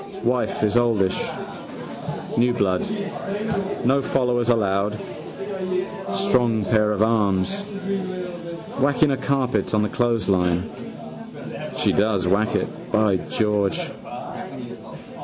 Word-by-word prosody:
Wife 125 -2 +1
is 105 +2 +3
oldish. 110 -6 +3 1.1
New 120 +1 +4
blood. 95 -5 +2 1.0
No 135 +3 +4
followers 125 -3 +1
allowed. 105 -2 +2 1.2
Strong 120 - +3
pair 105 +1 +3
of 105 0 +3
arms. 110 - +2 1.2
Whacking 140 +2 +4
a 135 - +1
carpet 130 -6 +1
on 105 - +3
the 105 - 0
clothesline. 95 -7 +2 1.1
She - - +3
does 100 -3 +2
whack 105 +4 +2
it, - - -3
by 110 -3 +4
George. 105 0 +1
110 Hz, 95 wpm, -23 LUFS, 100-120 Hz, 1.2 s, New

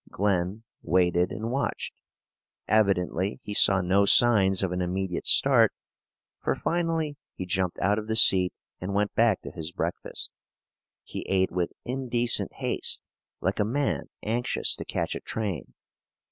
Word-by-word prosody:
Glen 100 +1 -1 0.2
waited 90 0 +1
and 110 +2 -4
watched. 140 +2 -3 0.7
Evidently 100 -2 +1
he 105 - -6
saw 100 -2 +5
no 95 +3 +2
signs 100 -3 +4
of 95 - -1
an 90 0 -2
immediate 90 0 -3
start, - - +4 0.7
for - - -1
finally 165 -3 -2 0.2
he 95 - -5
jumped 90 0 -1
out 100 +3 +1
of 110 - -8
the 110 - -1
seat 95 -4 +6 0.3
and 95 +2 -4
went 105 0 0
back 115 -4 +2
to - - -8
his 80 -1 -6
breakfast. 85 0 -4 0.7
He - - -7
ate 95 -1 +1
with 90 -1 -2
indecent 120 -2 +1
haste, - - -1 0.4
like 95 +4 -1
a - - +3
man 135 +6 -2
anxious 120 +3 -1
to - - -7
catch - - -3
a - - -5
train. 100 - -5
100 Hz, 145 wpm, -26 LUFS, 90-115 Hz, 0.7 s, seat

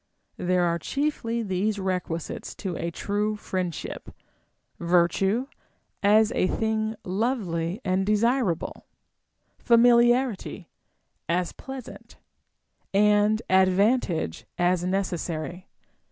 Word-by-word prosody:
There 180 0 +1
are 170 -1 +1
chiefly 235 - -2
these 200 +1 -1
requisites 180 -4 -3
to 185 -3 -4
a 170 - -3
true 205 +5 -1
friendship: 185 -5 -4 0.7
virtue, 180 +7 +2 0.6
as 215 +2 +4
a 185 - +1
thing 220 +1 -1
lovely 185 -4 -1
and 185 0 +1
desirable; 215 -3 0 0.8
famiharity, 240 -3 +3 0.6
as 175 +1 0
pleas 265 -3 -8
ant; - - -13 0.7
and 210 +2 +3
advantage, 190 - +2
as 175 0 +2
necessary. 180 -2 -3
195 Hz, 90 wpm, -26 LUFS, 180-220 Hz, 0.8 s, as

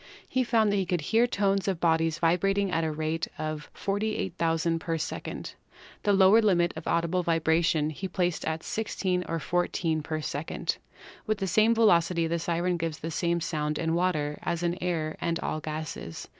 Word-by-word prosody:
He 260 - +1
found 225 -3 +3
that 205 - +1
he 190 - +1
could 180 -3 0
hear 225 +10 +3
tones 200 -4 +1
of 190 -4 0
bodies 165 -1 +2
vibrating 195 +4 +2
at 165 -1 +1
the 160 -1 -1
rate 155 +1 -2
of 155 -1 -4
48,000 170 -5 -1
per 165 0 -2
second. 155 - -5 0.5
The 205 - +2
lower 195 +3 +6
limit 175 -5 +3
of 160 - -7
audible 170 +2 +1
vibration 160 -2 +2
he 190 +5 -5
placed 180 -2 -1
at 160 0 -2
16 190 -4 -1
or 165 - 0
14 165 -1 0
per 155 +1 -3
second. 150 +1 -3 0.5
With 215 0 +1
the 195 - -2
same 215 +6 +4
velocity 170 -6 +4
the 170 +1 -1
siren 175 +2 0
gives 165 -2 -3
the 165 - -5
same 170 +1 0
sound 155 -2 -1
in 160 0 0
water 160 -4 0
as 170 0 -2
in 175 0 +1
air 165 -3 -1
and 170 -1 0
all 155 - -2
gases. 155 - -6
170 Hz, 180 wpm, -28 LUFS, 160-190 Hz, 0.5 s, lower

